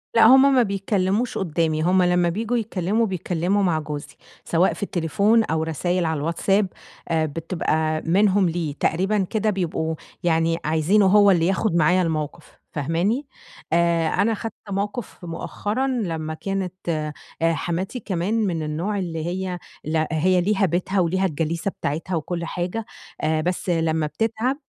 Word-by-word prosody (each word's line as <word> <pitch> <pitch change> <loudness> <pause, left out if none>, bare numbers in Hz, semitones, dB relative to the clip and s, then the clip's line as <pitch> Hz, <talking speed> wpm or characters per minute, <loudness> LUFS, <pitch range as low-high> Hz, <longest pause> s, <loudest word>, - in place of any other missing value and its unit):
لأ 230 - +7
هُم 265 +4 +7
ما 250 - +5
بيتكلّموش 200 +2 0
قُدّامي، 160 -3 0
هُم 185 +2 +4
لمّا 180 -1 +3
بييجوا 225 +6 -1
يتكلّموا 215 0 0
بيتكلّموا 185 +1 0
مع 170 -4 +2
جوزي، 150 -1 -6 0.3
سواء 175 +3 +2
في - - -6
التليفون 200 +6 +2
أو 160 -3 -1
رسايل 175 +3 -1
على 160 -1 0
الواتساب، 190 +6 +1 0.4
آآ 160 -1 +2
بتبقى 155 0 -1
منهم 190 +1 +3
ليه، 160 -3 -2
تقريبًا 190 +6 +1
كده 215 0 0
بيبقوا 165 -4 -1 0.3
يعني 165 -1 +2
عايزينه 160 +7 +3
هو 205 +1 +6
اللي 170 -1 +3
ياخد 195 -1 +1
معايا 170 +3 +4
الموقِف، 155 -4 -3 0.2
فاهماني، 170 - 0 0.5
آآ 170 -1 +3
أنا 200 +7 +2
خَدت 220 0 -5 0.2
موقِف 205 +3 -3
مؤخرًا 205 +9 -2
لمّا 165 -11 -2
كانت 190 +2 -3 0.2
آآ، 155 -2 -1 0.4
حماتي 185 +9 -3
كمان 190 0 -2
من 165 -3 -2
النوع 170 +7 -2
اللي 165 -3 -3
هي، 180 0 -3 0.2
لأ 155 0 0
هي 180 +3 +3
ليها 200 +1 +2
بيتها 185 +3 0
وليها 185 +2 +1
الجليسة 165 +2 -1
بتاعتها 165 +4 -3
وكلّ 170 +2 -3
حاجة، 180 +6 -3 0.4
آآ 155 0 +1
بس 180 +2 -2
لمّا 160 -2 +1
بتتعَب، 225 - -1
180 Hz, 150 wpm, -23 LUFS, 160-200 Hz, 0.5 s, لأ